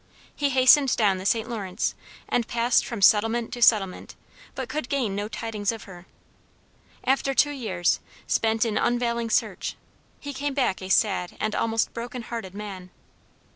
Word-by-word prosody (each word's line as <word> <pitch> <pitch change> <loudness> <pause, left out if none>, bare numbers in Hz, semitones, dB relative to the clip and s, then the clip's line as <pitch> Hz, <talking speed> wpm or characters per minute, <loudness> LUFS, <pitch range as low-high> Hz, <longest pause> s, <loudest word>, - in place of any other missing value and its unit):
He 285 -1 0
hastened 265 +1 +5
down 200 -4 +2
the 190 - -2
St. 225 +1 +1
Lawrence 205 -6 -2 0.3
and 235 -2 0
passed 235 0 +2
from 230 -5 -4
settlement 225 +3 +3
to 240 - -6
settlement, 205 -5 +3 0.4
but - - -4
could 300 -4 -4
gain 255 -8 0
no 205 +1 -2
tidings 215 -2 -3
of 225 -2 -8
her. 180 -2 -13 1.0
After 270 +1 +1
two 290 - +4
years, 200 -11 0 0.3
spent 225 0 +1
in 215 -2 0
unavailing 235 -1 0
search, - - -1 0.4
he 285 -1 -6
came 280 +1 -3
back 250 -10 0
a 185 - -7
sad 190 -3 +1
and 215 0 -1
almost 225 0 0
broken 240 +1 -6
hearted 225 -6 -6
man. 195 -3 -7
225 Hz, 160 wpm, -25 LUFS, 205-245 Hz, 1.0 s, hastened